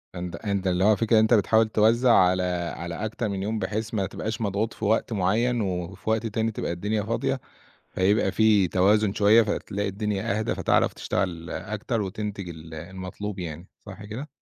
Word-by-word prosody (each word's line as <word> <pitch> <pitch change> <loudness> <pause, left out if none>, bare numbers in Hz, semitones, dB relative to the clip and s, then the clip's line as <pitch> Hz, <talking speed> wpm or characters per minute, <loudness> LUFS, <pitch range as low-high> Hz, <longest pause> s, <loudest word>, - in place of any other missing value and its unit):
أنت 90 -1 -5
أنت 100 -1 -2
اللي 90 +1 +1
هو 110 - +6
الفكرة 110 +1 +3
أنت 110 +2 +4
بتحاول 110 +1 +4
توزّع 115 +3 +4
على 90 0 +4 0.3
على 85 0 -5
أكتر 110 0 -3
من 95 -1 -3
يوم 110 +1 -2
بحيث 110 +4 -3
ما 100 -3 0
تبقاش 110 +4 -4
مضغوط 105 +2 -1
في 110 - -5
وقت 110 +2 +1
معيّن 110 +5 +1
وفي 90 +1 -4
وقت 110 +1 +1
تاني 110 +1 -1
تبقى 95 - -3
الدنيا 105 +4 -1
فاضية، 115 +2 -1 0.5
فيبقى 100 +4 +2
في 105 -4 +4
توازن 100 +2 +3
شوية، 110 +3 +6
فتلاقي 100 -1 -2
الدنيا 100 0 -2
أهدى، 110 - -1
فتعرف - - +2
تشتغل 85 -3 -3
أكتر 110 +2 -3
وتنتج 100 -1 -5
ال 80 -1 -9
المطلوب 95 +4 -6
يعني، 85 0 -6 0.2
صح 100 +1 -9
كده؟ 120 +8 -6
105 Hz, 175 wpm, -25 LUFS, 95-110 Hz, 0.5 s, هو